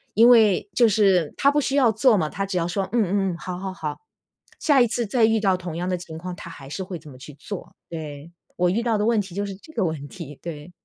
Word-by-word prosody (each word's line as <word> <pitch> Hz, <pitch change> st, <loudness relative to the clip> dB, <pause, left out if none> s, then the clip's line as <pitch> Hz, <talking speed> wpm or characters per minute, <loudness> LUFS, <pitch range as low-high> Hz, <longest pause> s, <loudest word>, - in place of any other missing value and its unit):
因 230 Hz, +3 st, +7 dB
为 215 Hz, -5 st, +5 dB
就 235 Hz, -3 st, +5 dB
是 195 Hz, -6 st, +3 dB
他 280 Hz, -, +4 dB
不 295 Hz, 0 st, +2 dB
需 275 Hz, -, -1 dB
要 255 Hz, -5 st, +5 dB
做 230 Hz, 0 st, +4 dB
嘛， 155 Hz, -3 st, +1 dB
他 195 Hz, -, -3 dB
只 190 Hz, -2 st, -3 dB
要 170 Hz, 0 st, 0 dB
说 190 Hz, +1 st, -2 dB
嗯 240 Hz, -, 0 dB
嗯 180 Hz, -, -3 dB, 0.2 s
嗯， -, -, -7 dB
好 180 Hz, 0 st, -6 dB
好 190 Hz, 0 st, -4 dB
好， 155 Hz, -4 st, -5 dB, 0.6 s
下 280 Hz, -4 st, +4 dB
一 240 Hz, -, +5 dB
次 235 Hz, +1 st, -1 dB
再 225 Hz, +2 st, +3 dB
遇 220 Hz, 0 st, +2 dB
到 195 Hz, -3 st, +2 dB
同 170 Hz, -2 st, -6 dB
样 180 Hz, +1 st, -2 dB
的 180 Hz, -, +1 dB
情 160 Hz, -2 st, -9 dB
况， 180 Hz, +1 st, -6 dB
他 175 Hz, -3 st, -9 dB
还 135 Hz, -4 st, -11 dB
是 190 Hz, +5 st, -4 dB
会 180 Hz, -1 st, -6 dB
怎 155 Hz, -, -16 dB
么 130 Hz, -, -14 dB
去 145 Hz, +1 st, -11 dB
做。 200 Hz, +6 st, -8 dB
对， 155 Hz, -1 st, -7 dB, 0.2 s
我 180 Hz, 0 st, +2 dB
遇 225 Hz, +5 st, 0 dB
到 230 Hz, -3 st, +1 dB
的 210 Hz, -, 0 dB
问 225 Hz, -2 st, +3 dB
题 190 Hz, -2 st, -10 dB
就 205 Hz, 0 st, -1 dB
是 200 Hz, -, -5 dB
这 315 Hz, +11 st, -15 dB
个 205 Hz, -5 st, 0 dB
问 150 Hz, -3 st, -3 dB
题， 150 Hz, -6 st, -10 dB
对。 160 Hz, 0 st, -8 dB
190 Hz, 295 characters per minute, -24 LUFS, 170-220 Hz, 0.6 s, 因